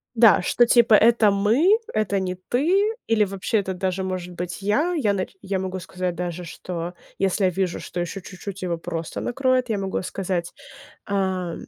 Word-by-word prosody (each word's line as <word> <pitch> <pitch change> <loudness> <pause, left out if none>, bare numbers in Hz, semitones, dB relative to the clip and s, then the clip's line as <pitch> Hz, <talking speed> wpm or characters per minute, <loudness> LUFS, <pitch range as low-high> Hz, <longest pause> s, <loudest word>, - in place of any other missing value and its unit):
Да, 225 -5 +6
что 240 +6 +3
типа 235 -2 +5
это 225 -1 +5
мы, 230 - +4 0.2
это 200 -2 +1
не 185 -1 -2
ты, 340 - +1
или 225 -2 +3
вообще 200 +3 -1
это 190 -1 -3
даже 185 +1 -2
может 185 -1 -4
быть 175 +2 -5
я. 290 - +1
Я 225 -11 +1
нач 190 -1 -3
я 195 -1 -2
могу 185 0 -3
сказать 180 0 -4
даже, 175 0 -4
что 170 +1 -6 0.3
если 195 0 +1
я - - +4
вижу, 185 -1 -1
что 175 - -6
ещё 175 +3 -3
чуть-чуть 195 +1 -8
его 175 -2 -1
просто 165 0 -5
накроет, 255 -1 +1
я 215 - 0
могу 195 -1 -2
сказать, 180 -2 -3 0.5
а, 190 -3 -1
195 Hz, 180 wpm, -23 LUFS, 180-220 Hz, 0.5 s, Да